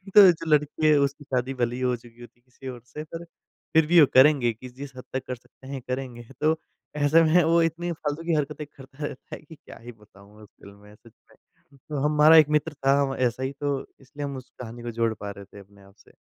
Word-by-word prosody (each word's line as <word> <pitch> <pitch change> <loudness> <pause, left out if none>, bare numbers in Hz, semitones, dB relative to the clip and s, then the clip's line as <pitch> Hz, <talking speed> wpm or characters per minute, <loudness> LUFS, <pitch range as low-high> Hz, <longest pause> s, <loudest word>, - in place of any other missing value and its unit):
तो 205 - +11
जो 165 - -7
लड़की 150 +1 +1
उसकी 140 +1 0
शादी 130 -1 -2
भले 120 -1 -1
ही 130 - -6
हो 125 -1 +1
चुकी 120 0 -16
होती 120 0 -14
है - - -36
किसी 130 +1 -13
और 125 -2 -7
से, 150 +5 -8
पर 165 +2 -8 0.5
फिर 160 -1 +5
भी 175 0 +6
वो - - +8
करेंगे 130 -3 +5
कि 125 +3 -11
जिस 135 +1 -10
हद 125 - -8
तक 130 - -3
कर 125 - -3
सकते 130 +2 -19
हैं 135 -2 -6
करेंगे। 125 -2 -5 0.2
तो 155 +1 +3 0.4
ऐसे 150 +3 +4
में 165 +2 +4
वो 165 +1 +3
इतनी 165 +2 -1
फ़ालतू 155 0 -4
की 165 -1 -1
हरकतें 150 0 -3
करता 135 +1 -10
रहता 135 - -8
है - - -13
कि 155 +1 -14
क्या - - -14
ही 120 +1 -10
बताऊँ 105 -1 -19
उस - - -15
फ़िल्म 100 0 -13
में 105 +1 -17
सच 115 +1 -20 0.2
में। - - -22 0.5
तो 150 - -3
हमारा 150 +2 +6
एक 150 -1 +6
मित्र 150 +1 0
था 140 0 +2
व - - -4
ऐसा 125 0 0
ही 135 - -2
तो 145 -1 0 0.2
इसलिए 145 +2 -8
हम 140 -1 -5
उस 130 - -11
कहानी 120 0 -9
को 120 - -4
जोड़ 115 0 0
पा 100 -1 -7
रहे 100 0 -11
थे 100 - -15
अपने 100 0 -18
आप 100 +1 -20
से। - - -23
135 Hz, 250 wpm, -25 LUFS, 120-150 Hz, 0.5 s, तो